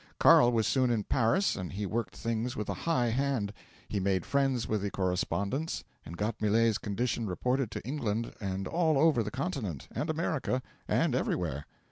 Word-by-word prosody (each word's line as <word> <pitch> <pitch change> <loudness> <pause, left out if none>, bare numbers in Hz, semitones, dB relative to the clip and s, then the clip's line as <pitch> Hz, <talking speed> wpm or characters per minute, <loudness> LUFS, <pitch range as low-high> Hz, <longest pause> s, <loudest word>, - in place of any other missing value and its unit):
'Carl 120 0 +7
was 115 -2 +2
soon 130 -2 +2
in 115 -3 +1
Paris 135 - +2
and 90 -1 -5
he 100 +2 -3
worked 105 -1 -2
things 115 +1 -2
with 105 - -3
a - - 0 0.2
high 125 -7 +2
hand. 125 -4 0 0.3
He 105 - -2
made 95 -2 +1
friends 135 -4 +1
with 110 -2 0
the 100 - -1
correspondents, 100 - -1 0.2
and 85 - -9
got 105 +1 -2
Millet's 110 +1 +3
condition 110 +2 -1
reported 125 +6 0
to - - -6
England 115 -5 -2
and 95 -1 -2
all 160 -3 +2
over 150 -4 +4
the 105 - -2
continent, 125 - -3
and 155 - -3
America, 155 -5 -1 0.2
and - - +2
everywhere. 70 +2 -1
115 Hz, 175 wpm, -30 LUFS, 100-135 Hz, 0.3 s, Carl